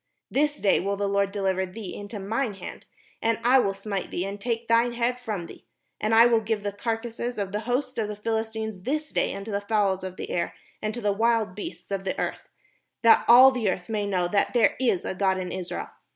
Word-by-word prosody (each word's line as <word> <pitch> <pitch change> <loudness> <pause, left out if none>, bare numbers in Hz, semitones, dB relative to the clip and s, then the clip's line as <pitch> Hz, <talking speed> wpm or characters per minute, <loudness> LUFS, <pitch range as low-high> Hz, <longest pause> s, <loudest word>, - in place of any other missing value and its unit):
This 295 +1 +1
day 200 - +3
will 200 +2 -1
the 200 0 0
Lord 200 0 +1
deliver 190 -2 0
thee 190 +1 -7
into 205 +1 -7
mine 220 +3 -2
hand; - - -9 0.3
and 230 0 +1
I 255 +3 +6
will 195 -5 +1
smite 195 -1 -4
thee, 180 - -2
and 200 +1 -6
take 230 0 -2
thine 235 +1 +3
head 240 +1 0
from 215 -8 -4
thee; - - -13 0.3
and 215 +1 +1
I 230 +1 +8
will 235 -1 +4
give 215 -1 -2
the 205 - -1
carcases 230 +3 -3
of 200 -2 -2
the 210 - -1
host 255 0 -1
of 215 - 0
the 210 - -5
Philistines 220 -1 -3
this 300 +7 -2
day - - 0
unto 200 +2 -6
the 200 0 -1
fowls 200 -3 +1
of 185 -1 -5
the - - -6
air, 170 - -1 0.3
and 215 - -1
to 240 - -5
the 205 -2 +1
wild 225 -2 +1
beasts 200 0 -8
of 195 -1 -2
the 190 - -2
earth; - - -3 0.5
that 230 - +7
all 255 +3 +9
the 240 -6 0
earth 180 +1 -3
may 210 -2 -1
know 180 -3 +1
that 200 +6 +1
there 230 -3 +4
is 235 -9 +1
a - - -2
God 190 0 +1
in 185 -1 -4
Israel. 185 -1 -5
210 Hz, 230 wpm, -26 LUFS, 195-230 Hz, 0.5 s, all